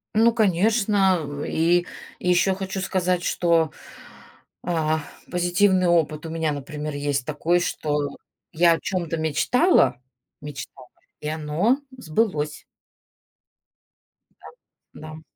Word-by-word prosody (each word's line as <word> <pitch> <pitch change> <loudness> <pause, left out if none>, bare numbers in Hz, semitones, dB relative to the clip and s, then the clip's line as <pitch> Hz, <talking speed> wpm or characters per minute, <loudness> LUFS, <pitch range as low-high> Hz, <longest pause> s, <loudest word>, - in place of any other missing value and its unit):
Ну 225 +2 +5
конечно. 205 -1 +3
М, 145 -1 -5
и 175 +2 +2 0.3
еще 180 +1 +2
хочу 190 0 -4
сказать, 185 -1 0
что, 165 -3 +2 0.9
а, 160 -2 0 0.3
позитивный 180 +1 +2
опыт 160 -2 +1
у - - -5
меня, 160 -1 -1
например, 150 +1 -5
есть 145 -2 -1
такой, 160 +4 +1
что 150 -4 -2 0.4
я 170 +1 +5
о 165 - -2
чем-то 170 -4 -2
мечтала 160 - +2 0.4
мечтала 140 -3 -9 0.3
и 150 - -5
оно 160 - 0 0.2
сбылось. 155 -6 -1 1.8
Да, - - -12 0.5
да, 155 - -8
м. 155 - -12
170 Hz, 110 wpm, -23 LUFS, 150-185 Hz, 1.8 s, Ну